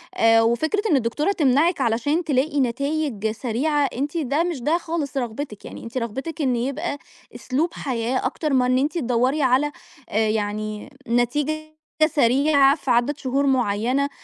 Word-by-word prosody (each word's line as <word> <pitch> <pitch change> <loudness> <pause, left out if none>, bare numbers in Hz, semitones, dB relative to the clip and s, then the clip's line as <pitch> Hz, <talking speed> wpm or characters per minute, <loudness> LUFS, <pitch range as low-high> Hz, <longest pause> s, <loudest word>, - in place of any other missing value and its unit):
آآ 225 0 +5
وفكرة 240 - +1
إن - - +5
الدكتورة 270 - 0
تمنعِك 305 -1 +2
علشان 265 +8 +1
تلاقي 290 0 0
نتايج 270 -3 -1
سريعة 270 +5 0
أنتِ 290 +6 -2
ده 295 +1 0
مش 340 -7 -3
ده 300 +7 +2
خالص 320 -5 -4
رغبتِك، 240 -2 -4
يعني - - -9
أنتِ 230 +3 -6
رغبتِك 265 +7 -4
إن 260 -4 +1
يبقى 280 +6 -2 0.4
أسلوب 315 +7 -1
حياة 250 -1 -2
أكتر 300 +3 -1
ما 255 -1 +3
إن 255 0 +2
أنتِ 290 +5 0
تدوري 255 +1 +1
على 265 +3 +2 0.4
آآ 220 +1 +1
يعني 215 +1 -3 0.2
نتيجة 295 +6 -1 0.2
سريعة 280 0 +4
في 280 -4 -3
عدد 245 +5 +2
شهور 275 -1 0
معينة 255 +2 +1
270 Hz, 150 wpm, -23 LUFS, 235-300 Hz, 0.4 s, آآ